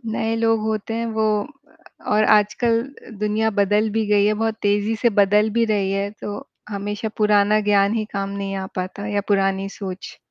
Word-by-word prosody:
नए 225 0 -2
लोग 225 -1 +2
होते 220 0 -3
हैं, 230 +1 -2
वो 220 -1 -1 0.9
और 215 - +4
आजकल 230 +3 +3 0.4
दुनिया 215 +1 0
बदल 210 +2 +2
भी 220 0 -1
गयी 205 0 +3
है, 215 - +2
बहुत 225 +1 -1
तेजी 205 +2 +1
से 235 +1 +2
बदल 210 +2 +3
भी 230 +2 +2
रही 195 -2 0
है, 200 +1 -1
तो 205 -1 -7 0.2
हमेशा 205 +1 -4
पुराना 210 0 +3
ज्ञान 200 +1 +3
ही 220 - -1
काम 195 0 -3
नहीं 200 0 -4
आ 190 0 -4
पाता 185 +2 -4
या 205 -1 0
पुरानी 195 -1 +1
सोच। 190 -2 -7
210 Hz, 180 wpm, -21 LUFS, 200-220 Hz, 0.9 s, और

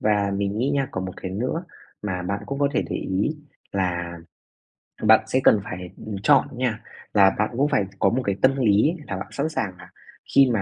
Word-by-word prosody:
Và 105 -1 +2
mình 100 +1 -1
nghĩ 135 +4 +1
nha, 140 -2 0
còn 95 - -3
một 95 - -5
cái 95 - -6
nữa 125 - -2 0.4
mà 90 -3 -2
bạn 100 +2 -3
cũng 140 0 -4
có 145 - +3
thể - - +2
để - - -1
ý 100 +12 -1 0.4
là 85 -3 -2 0.9
bạn 110 0 +6
sẽ 130 - +2
cần 105 - +6
phải, 90 -3 -6 0.2
ừm, 110 -1 -4
chọn 140 -1 +5
nha, 115 -3 -1 0.3
là 100 -2 +5
bạn 105 - +2
cũng 140 - +3
phải 100 - +2
có 95 - +4
một 130 +3 0
cái 100 -1 0
tâm 135 +1 +5
lý 110 +3 +4 0.2
là 95 - -3
bạn 95 - -5
sẵn 145 +3 -1
sàng 100 -12 -2
là 90 0 -13 0.5
khi 135 -2 +7
mà 105 - +1
105 Hz, 220 wpm, -24 LUFS, 95-130 Hz, 0.9 s, khi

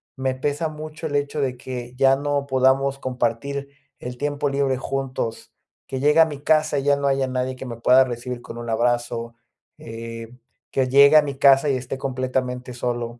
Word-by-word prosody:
me 130 -1 -1
pesa 145 +4 -2
mucho 155 +1 -7
el 145 - -4
hecho 145 +1 -1
de 130 -2 -1
que 125 -1 -7
ya 135 +1 +4
no 145 0 -1
podamos 135 +1 +2
compartir 130 +3 -2 0.3
el 125 0 -7
tiempo 145 0 -1
libre 135 -2 0
juntos, 130 -4 -4 0.4
que 130 - -4
llegue 150 +3 +3
a 165 - +8
mi 150 -3 -7
casa 155 -1 +2
y - - -4
ya 145 0 +4
no 140 0 -1
haya 135 -1 +1
nadie 130 0 -2
que 130 - -8
me 120 -2 -6
pueda 125 +3 +5
recibir 125 0 -5
con 115 - -9
un 120 0 -6
abrazo, 120 0 -1 0.5
eh, 115 +1 -8 0.3
que 130 -1 +1
llegue 140 +3 +7
a - - +8
mi 140 -2 -4
casa 135 +1 +5
y 135 - +2
esté 130 +1 -5
completamente 130 -1 -3
solo. 120 -1 -3
130 Hz, 190 wpm, -23 LUFS, 125-140 Hz, 0.5 s, a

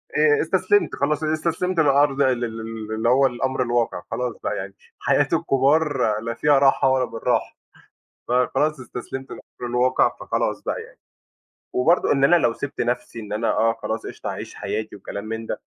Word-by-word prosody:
آآ، 445 -1 +4
استسلمت، 410 -1 +2
خلاص 150 +2 0
استسلمت 165 +3 -1
للأرض 140 -2 +3
ال 130 -3 +2
ال 115 -1 -6
ال 110 -1 -7
اللي 110 +2 +1
هو 135 +2 +5
الأمر 130 +1 -2
الواقع 120 -1 0
خلاص 125 -2 -2
بقى - - -1
يعني - - -6 0.3
حياة - - +2
الكُبار 135 -5 +2
لا 115 +1 -4
فيها 145 +4 +3
راحة 135 -1 +4
ولا 130 -1 +2
بالراحة، 115 -2 -2 0.7
فخلاص 140 +4 +1
استسلمت 130 +1 -7
للأمر 120 - -8
الواقع، 125 +1 +3
فخلاص - - -1
بقى - - -3
يعني. - - -15 0.7
وبرضه 165 +8 +3
إن 135 -1 +2
أنا 175 +5 +6
لو 120 -8 +2
سِبت 140 +4 -6
نَفْسي 120 -1 -2
إن 105 -2 -8
أنا 110 +2 0
آه 115 +1 +2
خلاص - - -3
قِشطة - - -6
أعيش - - -7
حياتي 110 0 -4
وكلام 100 +1 -7
من 110 +1 -5
ده، - - -4
130 Hz, 170 wpm, -23 LUFS, 115-145 Hz, 0.7 s, أنا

